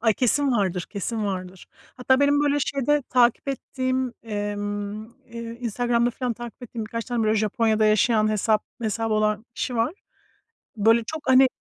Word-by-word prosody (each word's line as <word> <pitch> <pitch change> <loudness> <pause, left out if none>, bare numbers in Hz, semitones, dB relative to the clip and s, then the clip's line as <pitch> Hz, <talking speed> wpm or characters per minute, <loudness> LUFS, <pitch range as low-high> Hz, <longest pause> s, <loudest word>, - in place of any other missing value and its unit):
Ay, 225 -2 +3
kesin 270 +5 +2
vardır, 190 -5 0
kesin 215 +1 -3
vardır. 185 -1 -5 0.3
Hatta 260 +1 +2
benim 285 0 +4
böyle 290 0 +2
şeyde 280 +2 +1
takip 245 +2 +3
ettiğim, 260 -1 -2
emm, 205 -1 -4 0.2
eee, 235 -1 -8 0.2
Instagram'da 240 0 +1
filan 245 0 -2
takip 240 +2 -9
ettiğim 230 -2 -5
birkaç 230 +1 -4
tane 240 -3 -1
böyle 215 0 +2
Japonya'da 220 0 +2
yaşayan 215 +1 +3
hesap 215 0 +1 0.2
hesabı 225 0 -1
olan 215 0 +1
kişi 250 - -3
var. 230 +6 +1 0.9
Böyle, 225 +3 +4
çok 315 +6 -6
hani 260 0 +7
230 Hz, 155 wpm, -24 LUFS, 215-255 Hz, 0.9 s, hani